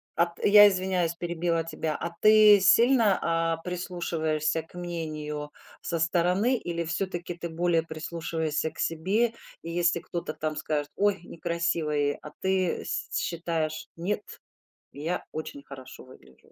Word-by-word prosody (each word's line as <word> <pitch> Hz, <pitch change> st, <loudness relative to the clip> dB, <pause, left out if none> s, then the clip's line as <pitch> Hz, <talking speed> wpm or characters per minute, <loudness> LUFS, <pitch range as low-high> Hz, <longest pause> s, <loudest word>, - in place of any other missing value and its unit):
а, 170 Hz, +1 st, +3 dB
т 170 Hz, -, -3 dB
я 205 Hz, 0 st, +10 dB
извиняюсь, 185 Hz, -3 st, 0 dB
перебила 170 Hz, -1 st, -1 dB
тебя, 160 Hz, -1 st, -3 dB
а 170 Hz, -, -4 dB
ты 215 Hz, -1 st, +8 dB
сильно, 230 Hz, 0 st, +5 dB
а, 165 Hz, 0 st, 0 dB
прислушиваешься 165 Hz, -3 st, -2 dB
к 160 Hz, -, -24 dB
мнению 155 Hz, -4 st, -5 dB, 0.3 s
со 165 Hz, -1 st, -2 dB
стороны 180 Hz, +9 st, +2 dB
или 170 Hz, -3 st, -3 dB
всё-таки 175 Hz, +1 st, -3 dB
ты 170 Hz, -1 st, -6 dB
более 165 Hz, 0 st, +1 dB
прислушиваешься 160 Hz, -1 st, -3 dB
к -, -, -16 dB
себе? 200 Hz, +9 st, +1 dB, 0.3 s
И 165 Hz, -, -7 dB
если 170 Hz, 0 st, +2 dB
кто-то 170 Hz, -3 st, -5 dB
там 155 Hz, 0 st, -3 dB
скажет: 145 Hz, -1 st, -2 dB
"Ой, 205 Hz, -4 st, +1 dB
некрасивое", 165 Hz, -4 st, -1 dB
а 150 Hz, -, -10 dB
ты 190 Hz, -2 st, 0 dB
с -, -, -3 dB
считаешь: 165 Hz, -2 st, -2 dB
"Нет, 200 Hz, +5 st, -2 dB, 0.7 s
я 160 Hz, +5 st, -4 dB
очень 155 Hz, -2 st, -6 dB
хорошо 130 Hz, -2 st, -11 dB
выгляжу"? 65 Hz, -, -19 dB
170 Hz, 140 wpm, -27 LUFS, 155-180 Hz, 0.7 s, я